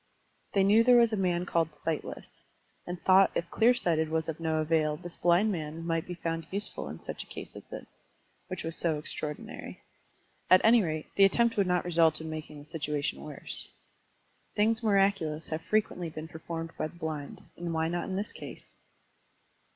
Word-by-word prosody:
They 195 - +4
knew 210 +4 +6
there 250 0 +7
was 235 -2 +5
a - - +3
man 180 -3 +1
called 165 -3 0
Sightless, 165 -2 -4 0.4
and 175 0 -4
thought 190 +1 +6
if 170 - -2
Clear 240 +2 +5
Sighted 160 -8 +1
was 160 0 -1
of 160 -1 -4
no 160 -1 0
avail 155 -1 +1
this 175 0 -8
blind 175 +5 +3
man 160 -2 -4
might 165 -1 -1
be 180 - -5
fotmd 165 -1 -4
useful 200 +2 -3
in - - -7
such - - -6
a - - -22
case - - -9
as - - -10
this, - - -10 0.5
which 185 -1 -5
was 165 0 -4
so 165 -3 0
extraordinary. 150 0 -6 0.7
At 185 - +8
any 230 +1 +7
rate, 155 -4 -2
the 200 - +7
attempt 235 +4 +3
would 200 -2 +2
not 180 -1 +1
result 165 -2 +3
in 160 0 -6
making 155 -1 -7
the 145 - -11
situation 150 -2 -2
worse. 150 -2 -7 0.9
Things 220 +2 +2
miraculous 195 -7 +2
have 155 0 -2
frequently 180 -4 0
been 155 0 -7
performed 165 0 -6
by - - 0
the 170 - -16
blind, 155 -4 -5
and 170 0 -4
why 160 0 +1
not 175 +1 -2
in 190 - -2
this 205 +2 -2
case? - - -10
170 Hz, 190 wpm, -30 LUFS, 160-195 Hz, 0.9 s, At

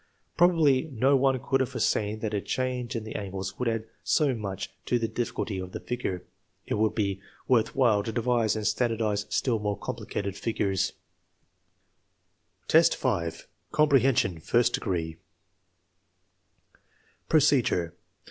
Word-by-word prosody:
Probably 165 -6 +4
no 135 +3 +3
one 135 -1 +2
could 135 +1 0
have 130 -1 0
foreseen 110 -4 -1
that 110 -1 -2
a 100 - 0
change 125 +1 -2
in 115 - -3
the 110 - -7
angles 95 -1 -5
would 125 - -1
add 115 -1 -1 0.2
so 145 -4 +2
much 100 -4 -5 0.2
to 125 - +2
the 115 -1 -1
difficulty 110 -4 -3
of 95 0 -7
the - - -4
figure. 110 -7 -4 0.4
It - - -3
would 110 0 +1
be 100 -3 -1 0.3
worth 115 -4 +2
while 115 -6 +4
to 115 - -4
devise 115 -1 +1
and 110 -1 -3
standardize 110 -4 0
still 120 -4 0
more 105 -1 -2
complicated 100 -1 -4
figures. 100 -4 -1 1.8
IV, 165 +1 +6
5. 85 - -2 0.2
Comprehension, 135 - +3
first 120 +8 +2
degree 80 -3 -2 2.1
Procedure. 125 - +3
115 Hz, 135 wpm, -27 LUFS, 100-130 Hz, 2.1 s, IV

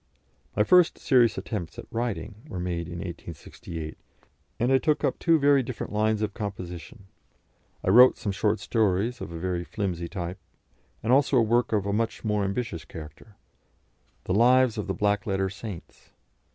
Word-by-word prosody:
My 105 - +4
first 180 +9 +5
serious 125 -5 +3
attempts 95 -8 -5
at - - -7
writing 115 -2 -3
were 95 - -6
made 85 -2 -3
in 85 - -7
1868, 85 -2 -7 0.6
and 120 +3 +2
I 130 - +5
took 150 +4 +1
up - - 0
two 165 -2 +4
very 140 -2 +4
different 120 -3 -6
lines 110 0 +1
of 105 -2 -2
composition; 100 +1 -7 0.8
I - - 0
wrote 125 +5 +8
some 105 - -3
short 105 +3 0
stories 110 +2 0
of - - -6
a 85 - -6
very 90 0 -2
flimsy 90 -3 -3
type, 90 0 -5 0.6
and 115 +3 +2
also 140 0 +4
a - - +6
work 120 +2 +2
of 105 -3 +1
a 100 - -1
much 115 +2 -1
more 105 -1 +1
ambitious 100 -4 -3
character, 80 +7 -11 0.9
"The 90 - -2
Lives 125 +2 +5
of 105 - -4
the 95 - -2
Black 105 +2 0
Letter 95 -1 0
Saints." 100 -3 -9
105 Hz, 170 wpm, -26 LUFS, 90-120 Hz, 0.9 s, wrote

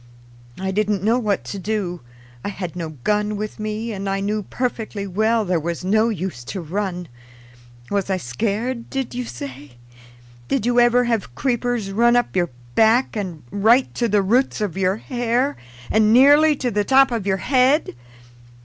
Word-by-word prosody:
I 190 0 -2
didn't 205 -1 0
know 230 +4 +3
what 210 -4 -1
to 200 - -6
do. 190 -3 -3 0.4
I - - -2
had 185 -4 -6
no 160 -4 -6
gun 210 0 0
with 215 +1 -5
me, 215 +2 -3
and 195 0 -4
I 195 0 -1
knew 210 +2 -1
perfectly 220 -2 -3
well 220 +4 +1
there 180 -2 +1
was 170 +2 -4
no 215 +4 +3
use 185 - -4
to 190 - -5
run. 180 +1 -3 0.8
Was 200 -1 -1
I 190 - +1
scared, 220 - -3
did 270 -2 -3
you 250 0 -3
say? 135 - -8 0.7
Did 260 -5 0
you 245 0 +3
ever 240 +1 +4
have 225 - -2
creepers 245 - -1
run 235 +4 +3
up 245 -4 +1
your 175 -2 +1 0.2
back 225 - +3
and 180 -8 -5
right 225 +6 +3
to 240 - 0
the 205 -2 +2
roots 240 +8 +1
of 205 -5 -2
your 190 0 +1
hair, 245 +3 -1 0.4
and 215 0 +4
nearly 290 +5 +6
to 250 -3 -2
the 205 0 +1
top 270 +3 +5
of 225 -4 -2
your 190 -1 +2
head? 265 - +2
210 Hz, 175 wpm, -21 LUFS, 190-240 Hz, 0.8 s, nearly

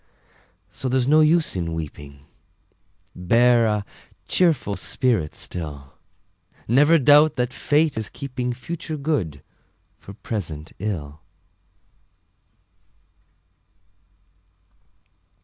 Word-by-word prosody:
So 130 - -4
there's 130 0 +1
no 155 +2 +5
use 155 - +2
in 85 -3 -3
weeping, 70 -3 -8 0.9
Bear 115 +5 +3
a 105 -1 -1 0.4
cheerful 160 - +1
spirit 110 - -1
still; 70 -6 -7 0.7
Never 145 +8 +5
doubt 150 +2 +5
that 125 +1 -2
Fate 150 +2 +1
is 110 - -5
keeping 125 -2 -4
Future 155 +5 -6
good 135 - -2 0.6
for 100 - -12
present 80 -8 -6
ill! 75 -8 -5
120 Hz, 85 wpm, -22 LUFS, -, 0.9 s, no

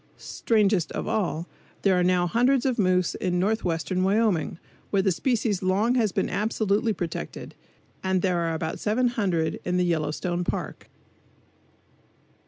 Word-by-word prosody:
Strangest 205 -7 +1
of - - -4
all, 185 -6 -1 0.4
there 185 -3 +3
now 180 0 +3
are - - 0
hundreds 245 +4 +2
of 255 -3 0
moose 185 -2 +2
in 180 -1 -1
northwestern 185 -2 0
Wyoming, 195 -5 +1 0.3
where 195 -2 +2
the 195 - +3
species 220 -2 0
long 200 +6 +2
has 225 -5 +2
been - - 0
absolutely 210 +2 0
protected, 175 -5 -5 0.5
and 190 -1 0
there 180 -2 +1
are 165 -1 -1
about 160 0 -3
700 210 -8 0
in 180 0 -1
the 180 - +2
Yellowstone 175 +2 -1
Park. - - -5
190 Hz, 140 wpm, -25 LUFS, 175-220 Hz, 0.5 s, there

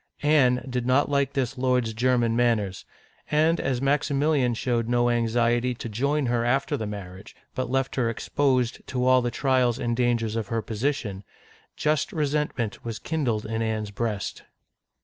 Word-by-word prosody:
Anne 130 -4 +3
did 125 -1 -2
not 130 +3 +3
like 140 -1 +1
this 135 -1 -2
lord's 125 -3 +1
German 120 0 +2
manners; 115 -6 0 0.4
and 160 +2 +3
as 130 -1 -1
Maximilian 140 -2 +2
showed 115 -1 -1
no 120 0 +2
anxiety 120 +1 +1
to 120 - -6
join 140 +7 0
her 120 -1 +1
after 135 +4 +1
the 110 -6 -3
marriage, 95 -2 -8 0.2
but 130 -1 -3
left 135 +1 0
her 120 -3 +2
exposed 130 +1 0
to 125 -1 -1
all 130 0 +5
the 120 - -1
trials 130 -2 +1
and 120 -2 -1
dangers 115 -3 0
of 110 -3 -2
her 115 -1 -2
position, 110 -4 -2 0.5
just 150 -2 0
resentment 150 -7 -2
was 115 -2 -4
kindled 125 -10 -2
in 110 +1 -2
Anne's 110 -2 -2
breast. 105 -1 -3
120 Hz, 160 wpm, -25 LUFS, 115-135 Hz, 0.5 s, all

